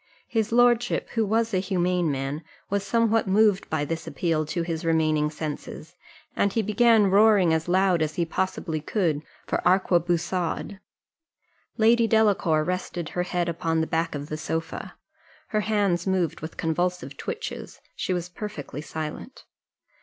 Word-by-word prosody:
His 225 -2 -1
lordship, 240 0 +3
who 225 - 0
was 225 +2 0
a 185 - +3
humane 180 -3 0
man, 135 +3 -3 0.3
was 200 -1 0
somewhat 225 0 +2
moved 205 0 +3
by 155 -2 0
this 165 +2 -4
appeal 160 -3 -1
to 170 +2 -2
his 165 -1 -3
remaining 155 -2 +2
senses, 155 +1 -6 0.4
and 200 - +2
he 225 +2 0
began 215 -1 +4
roaring 200 -4 +5
as 160 +1 -1
loud 185 -1 +3
as 155 0 -1
he 170 - 0
possibly 165 -2 -2
could 160 -3 0 0.2
for - - -1
arquebusade. 175 0 +1 1.0
Lady 230 +1 +4
Delacour 205 -8 +3
rested 175 -1 -3
her 180 - -2
head 180 -1 -1
upon 165 -1 -1
the 160 - +1
back 165 0 -1
of 145 0 -5
the 155 - -4
sofa, 165 +4 -4 0.5
her 215 - +1
hands 200 -4 0
moved 180 -4 0
with 160 - -7
convulsive 175 +3 -1
twitches 460 0 -6 0.2
she - - -3
was 175 -1 -1
perfectly 175 -7 -7
silent. 155 - -7
180 Hz, 150 wpm, -25 LUFS, 160-205 Hz, 1.0 s, roaring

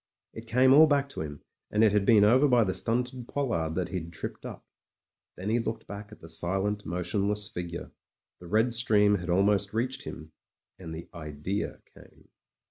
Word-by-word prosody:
It 110 +1 -10
came 130 +3 +5
all 155 +3 +8
back 140 -2 +1
to - - -6
him, 75 -2 -7 0.3
and 105 +1 +2
it 110 - +5
had 105 -1 +1
been 110 -3 +6
over 130 +7 +5
by 125 -3 +4
the 95 -3 -1
stunted 125 +3 -2
pollard 85 - -1
that 90 -1 -2
he'd 85 -3 -5
tripped 80 - -6
up. - - -10 0.7
Then 95 +4 -5
he 120 - +2
looked 115 -1 -4
back 100 +1 -9
at - - -14
the 80 - -11
silent, 95 +4 -2
motionless 100 +4 -1
figure 85 -1 -6 0.3
— - - -47
^the 85 - -11
red 110 +5 +2
stream 105 -3 +3
had 90 +1 -7
almost 100 +3 +2
reached 125 +3 -2
him 80 0 -8 0.2
— - - -52
and 80 -3 -7
the 85 +1 -8
Idea 80 +5 -4
came. - - -19
105 Hz, 195 wpm, -28 LUFS, 90-115 Hz, 0.7 s, all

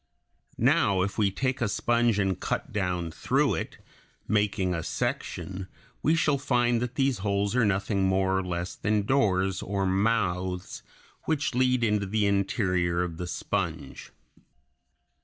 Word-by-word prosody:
Now 95 -2 +3
if 100 +3 -3
we 100 -2 +3
take 130 +6 -2
a 115 - +1
sponge 120 0 +2
and 95 -3 0
cut - - -3
down 90 -4 -1
through - - +1
it, - - -4 0.5
making 100 -3 +1
a 85 - -2
section, 95 +3 -3 0.3
we 155 - +3
shall 150 -3 +2
find 120 -3 +1
that 125 0 -3
these 135 -4 +1
holes 100 +2 0
are 125 -3 +3
nothing 100 0 +1
more 95 0 +2
or - - -2
less 90 0 -3
than 105 -1 0
doors 95 -7 +1
or 100 0 -1
mouths 95 -2 0 0.4
which 155 -2 0
lead 125 -1 +2
into 105 -3 +1
the 105 +1 +1
interior 90 -3 +1
of 85 -2 -5
the 90 - -4
sponge. - - -4
100 Hz, 145 wpm, -27 LUFS, 95-115 Hz, 0.5 s, Now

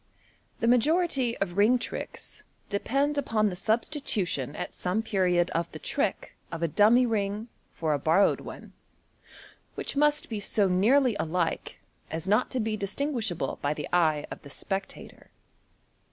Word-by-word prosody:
— - - -37
The 230 - +2
majority 260 0 +2
of 190 -2 -3
ring 220 +5 +5
tricks 235 - -6 0.3
depend 275 +8 0
upon 215 -6 +1
the - - -5
substitution 215 - -1
at - - -5
some 185 +5 -1
period 180 -5 +1
of 170 +1 -1
the - - -5
trick - - -2 0.2
of 165 0 -4
a - - +3
dummy 215 +10 +5
ring 215 0 -1 0.2
for 160 -2 -1
a 145 - 0
bor 160 +4 +2
rowed 200 - +4
one, - - -10 1.0
which - - -3
must 295 +1 +2
be 220 -3 -4
so 205 0 +2
nearly 230 +7 +3
alike 165 0 -2 0.3
as 160 +3 -5
not 210 +5 +3
to 260 - -2
be 220 -1 -1
distinguish 220 +2 -2
able 160 -6 -3
by 145 +1 0
the 150 - -5
eye 155 -4 +3
of - - -7
the 140 - -12
spectator. 195 +6 -5
205 Hz, 160 wpm, -28 LUFS, 175-245 Hz, 1.0 s, ring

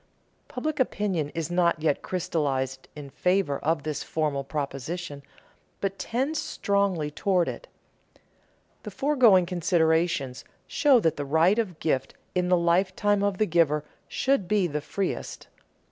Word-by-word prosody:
_ - - -41
Public 295 +4 -3
opinion 195 - 0
is 165 0 -3
not 175 -2 +2
yet 150 -2 0
crystallized 135 -7 -2
in 145 -2 -9
favor 180 -5 +1
of 160 +1 0
this 150 -2 -3
formal 150 -3 -1
proposition, 145 +2 -5 0.6
but 195 0 -3
tends 270 +7 -1
strongly 195 -7 0
toward 180 +1 +1
it. - - -6 1.1
The - - -7
foregoing 250 -11 +4
considerations 160 -6 +1 0.2
show 280 -5 +4
that 160 -5 +1
the 145 - -2
right 160 +9 +3
of 185 -8 -3
gift 140 -5 -1 0.2
in 180 -1 0
the 180 - +5
lifetime 185 +4 +2
of 200 -2 0
the 215 - +2
giver 160 -4 +2 0.2
should 260 -9 0
be 205 -1 +2
the 150 -3 -2
freest. 195 +5 -4
175 Hz, 140 wpm, -26 LUFS, 150-200 Hz, 1.1 s, the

